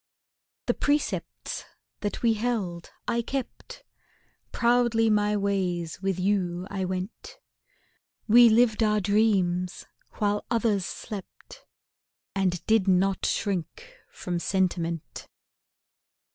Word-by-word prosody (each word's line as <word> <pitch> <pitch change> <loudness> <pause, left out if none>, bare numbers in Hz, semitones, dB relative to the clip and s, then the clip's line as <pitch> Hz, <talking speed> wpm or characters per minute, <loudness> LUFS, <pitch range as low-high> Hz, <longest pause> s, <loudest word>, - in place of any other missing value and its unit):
The - - +2
precepts 290 +1 -2 0.4
that 205 +3 -4
we 230 -1 +4
held 210 -7 -2 0.2
I 235 - +1
kept; 265 +2 -6 0.7
Proudly 235 -2 +3
my 210 0 +2
ways 185 -4 -1
with 195 -2 -1
you 180 -2 0
I 190 -2 -2
went: 185 - -5 0.9
We 235 +2 +8
lived 225 0 +3
our 210 -1 +3
dreams 190 -3 +1 0.3
while 205 0 0
others 220 -5 +1
slept, 205 -4 -9 0.7
And 185 -3 -1
did 220 -3 +3
not 190 +1 +2
shrink 210 - -3 0.2
from 175 -1 -4
sentiment. 170 -3 -2
200 Hz, 100 wpm, -27 LUFS, 185-225 Hz, 0.9 s, We